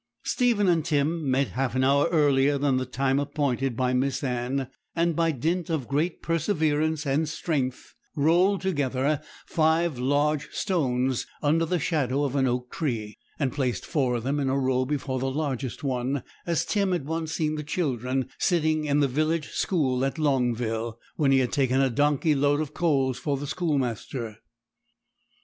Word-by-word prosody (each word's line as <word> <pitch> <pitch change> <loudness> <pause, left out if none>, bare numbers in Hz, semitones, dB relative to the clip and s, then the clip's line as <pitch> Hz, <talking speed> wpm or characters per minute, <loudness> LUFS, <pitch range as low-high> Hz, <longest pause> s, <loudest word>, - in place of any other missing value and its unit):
Stephen 235 -6 +2
and 170 -3 +3
Tim 155 0 0
met 135 +1 +2
half 130 -1 -2
an 130 - +2
hour 140 +3 +4
earlier 145 -3 +3
than 140 -2 +1
the 130 -1 -2
time 135 +1 +1
appointed 135 -4 -1
by 125 -1 +1
Miss 130 +1 0
Anne, 125 +1 -1 0.3
and 170 -1 +1
by 165 0 +2
dint 165 +6 -1
of 155 -7 -1
great 155 +5 -1
perseverance 160 -3 0
and 145 +3 +1
strength 140 -5 -3 0.2
rolled 175 +7 +3
together 145 -5 0 0.2
five 160 -3 +1
large 145 +3 +1
stones, 130 - 0 0.2
under 160 +3 +2
the 180 - +1
shadow 145 -4 0
of 140 -1 -1
an 135 -2 +3
oak 125 0 -2
tree; 115 -9 -3 0.2
and 135 -4 -1
placed 130 -4 -1
four 130 -6 0
of 115 - -3
them 140 +3 0
in 135 -2 0
a 135 - +1
row 130 -1 +1
before 135 -2 -2
the 135 +1 -1
largest 135 -2 -3
one, 130 0 -1 0.2
as 170 -2 +1
Tim 200 -3 +1
had 170 -6 -2
once 160 +1 -3
seen 155 -1 0
the 155 - -3
children 130 -5 -1
sitting 155 -3 +1
in 145 0 +2
the 140 - +4
village 155 +4 0
school 135 -10 0
at 135 +4 -1
Longville, 120 -6 0 0.2
when 145 -4 +2
he 135 - +5
had 130 -2 +1
taken 135 -3 +2
a 135 -2 +3
donkey 145 +4 +2
load 145 +1 +2
of 155 -1 -3
coals 135 -7 +1
for 145 -2 -1
the 145 - -5
schoolmaster. 130 - -2
140 Hz, 170 wpm, -26 LUFS, 130-155 Hz, 0.3 s, he